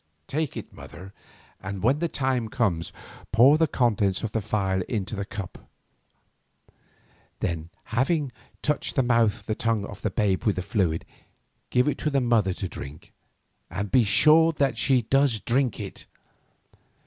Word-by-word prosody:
Take 155 0 -2
it, - - -8
mother, 95 +3 -11 0.5
and 95 0 -6
when 130 +6 +3
the 170 - 0
time 130 -7 -1
comes, 100 -10 -1 0.4
pour 130 +7 +6
the 160 - +4
contents 105 -8 +1
of 115 - -2
the 110 - -1
phial 95 -3 0
into 105 -2 -2
a - - -1
cup 100 -2 -7
of - - -21
water. 65 +2 -37 0.6
Then, 85 -1 -3
having 135 +4 0 0.3
touched 150 0 -1
the 135 - +3
mouth 115 -3 +1
and 110 - -2
tongue 115 -3 0
of 100 -2 -10
the 110 - 0
babe 95 -1 0
with 105 - +2
the 90 - -3
fluid, 90 -7 0 0.6
give 125 +2 +2
it 150 - -1
to 150 - 0
the 140 -2 +2
mother 115 -7 +2
to 95 - -4
drink 75 -3 -10 0.6
and 100 0 -4
be 130 -2 +5
sure 155 +10 +5
that 140 -4 +1
she 125 +1 +2
does 135 -1 +2
drink 125 +2 0
it. - - -7
115 Hz, 165 wpm, -25 LUFS, 95-130 Hz, 0.6 s, pour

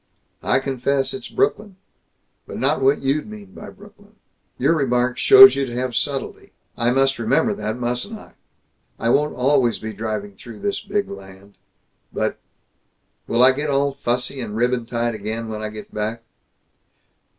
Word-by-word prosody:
"I - - +2
confess 135 0 -1
it's 200 +4 -7
Brooklyn 210 - -1 0.7
but - - -7
not - - 0
what 135 +2 +2
you'd 145 +8 0
mean 205 -2 -11
by - - -10
Brooklyn. 205 +1 -18 0.4
Your - - +2
remark 125 -3 0
shows 400 -1 +9
you 140 - 0
to 120 - -7
have 125 -1 -2
subtlety. 140 +2 -3 0.2
I 120 0 +1
must 135 +1 +2
remember 115 -1 +1
that, 110 +2 -4
mustn't 125 - -3
I! - - -16 0.6
I 115 - -1
won't 150 +4 +2
always 130 -2 +2
be 110 0 -7
driving 105 -1 -4
through 115 +1 -12
this 200 -1 -2
big 205 -1 -2
land. 100 0 -12 0.6
But - - -2 0.9
Will 120 +2 +3
I 130 - +8
get 145 +3 -3
all 140 0 +1
fussy 125 0 -2
and 105 -3 -6
ribbon 120 0 0
tied 120 0 -1
again, 110 +2 -5
when 110 -1 -5
I 110 - -3
go 105 0 -9
back?" 110 +2 -3
125 Hz, 160 wpm, -21 LUFS, 115-145 Hz, 0.9 s, shows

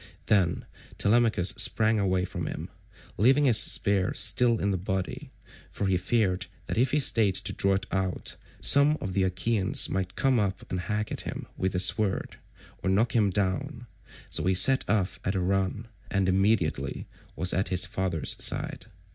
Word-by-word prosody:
Then 95 -5 0 0.3
Telemachus 110 -4 +2
sprang 110 0 +3
away 95 -2 0
from - - -6
him, - - -7 0.5
leaving 135 +7 +3
his 120 -5 +5
spear 100 -2 +2
still 120 -3 +2
in 100 - -1
the 95 - -1
body, 95 0 -5 0.4
for 100 - -4
he 95 -1 +1
feared 90 -1 -1 0.2
that - - -4
if 125 +3 +1
he 150 - 0
stayed 115 -8 +3
to - - -1
draw 100 0 +1
it 95 0 -3
out, 95 -1 -3 0.3
some 140 +1 +7
one - - -4
of 95 -8 -6
the 95 - 0
Achaeans 95 +2 0
might 95 -1 -3
come 135 -3 +1
up 100 -2 -3
and 90 - -2
hack 105 +3 -4
at - - -5
him - - -7
with 95 0 -2
his 90 0 +6
sword, 105 -2 0 0.4
or - - -2
knock 110 +6 +1
him 105 -4 +3
down, 95 -1 -3 0.5
so - - -1
he 95 0 +1
set 130 +8 +5
off 100 -3 -1
at 95 - -2
a - - 0
run, 95 +4 -2 0.2
and 100 -2 0
immediately 95 -8 -1 0.3
was 90 - -1
at 95 +2 -1
his 90 -1 +2
father's 90 -6 -2
side. - - -1
95 Hz, 180 wpm, -26 LUFS, 95-110 Hz, 0.5 s, some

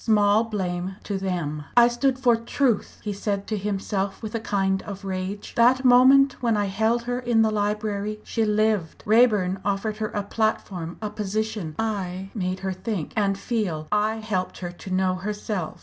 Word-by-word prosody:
Small 210 0 +4
blame 185 -3 -3
to 200 -2 -3
them! 165 -6 -3
"I 240 0 +8
stood 255 +2 +1
for 245 -2 +4
truth!" 230 0 0
he 210 - -2
said 200 0 -2
to 220 - -2
himself 200 0 -2
with 220 - -5
a 230 - -1
kind 195 -3 0
of 200 -1 -8
rage 190 +2 -4
"that 255 +3 +4
moment 265 +2 +6
when 230 -3 +2
I 205 - +1
held 220 +4 +1
her 245 +1 -2
in 240 -3 +3
the 220 - +2
library, 210 0 -1
she 225 - -1
lived. 210 -5 0
Raeburn 210 -4 +4
offered 205 +2 -1
her 215 0 -1
a 205 - -3
platform, 195 -5 -2
a 210 - -3
position; 210 -5 -3
I 195 -3 -3
made 185 -3 -2
her 190 -1 -2
think, 185 -3 -4
and 200 -3 +1
feel. 195 -9 -2
I 210 +1 +2
helped 215 -5 -3
her 175 -1 -5
to 175 +2 -11
know 185 0 +1
herself. 205 -2 -4
210 Hz, 180 wpm, -24 LUFS, 190-225 Hz, -, I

